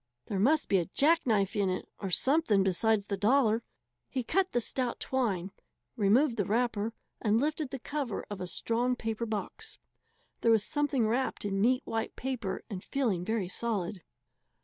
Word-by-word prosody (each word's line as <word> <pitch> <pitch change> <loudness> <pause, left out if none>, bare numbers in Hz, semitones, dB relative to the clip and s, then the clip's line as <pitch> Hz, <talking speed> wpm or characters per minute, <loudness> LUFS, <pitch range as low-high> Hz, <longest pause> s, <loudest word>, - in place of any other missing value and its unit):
There 195 - -2
must 295 +9 +3
be 195 - +3
a 170 - -2
jackknife 235 - +3
in 200 -2 +2
it, 185 - -3
or 195 - -3
something 245 - +3
besides 200 +2 +2
the 200 -1 -2
dollar. 225 +1 +3 0.5
He 260 -2 -2
cut 375 +9 +1
the 240 - +2
stout 245 +1 -2
twine, 200 -8 -1 0.4
removed 230 +4 +3
the 205 - +1
wrapper, 225 0 0 0.3
and 215 +1 +3
lifted 305 +1 -1
the 270 - -4
cover 275 -3 -4
of 205 -2 -6
a 180 - -3
strong 235 +7 0
paper 225 -1 -3
box. 220 - -5 0.6
There 230 - +2
was 225 -2 +5
something 280 -3 +1
wrapped 245 0 -1
in 195 -1 0
neat 250 +4 +3
white 225 0 -3
paper 245 -7 -3
and 190 -4 -6
feeling 230 -11 0
very 220 -1 -1
solid. 195 -2 -2
225 Hz, 170 wpm, -30 LUFS, 200-260 Hz, 0.6 s, was